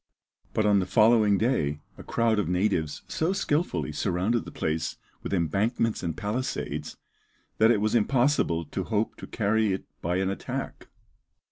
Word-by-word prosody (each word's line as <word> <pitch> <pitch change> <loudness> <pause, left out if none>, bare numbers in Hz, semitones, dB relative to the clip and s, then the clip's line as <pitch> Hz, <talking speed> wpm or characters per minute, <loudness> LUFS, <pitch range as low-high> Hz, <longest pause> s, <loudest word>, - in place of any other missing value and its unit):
But 110 - +2
on 105 -1 +4
the 90 - -1
following 110 0 +5
day 80 - 0 0.2
a - - -11
crowd 115 -2 +1
of 85 - -1
natives 90 -5 0
so 165 +4 0
skilfully 145 - -1
surrounded 95 +8 0
the - - -8
place 80 0 -2 0.2
with - - -6
embankments 100 - 0
and 85 -3 -3
palisades, 110 +5 -3 0.6
that 110 +1 +6
it 110 -4 +3
was 110 0 +1
impossible 120 - +2
to 95 +5 -4
hope 110 0 -1
to - - -9
carry 110 -1 +1
it 95 - -4 0.2
by 85 +2 -1
an 95 +1 +1
attack. 100 - -5
105 Hz, 155 wpm, -27 LUFS, 90-115 Hz, 0.6 s, that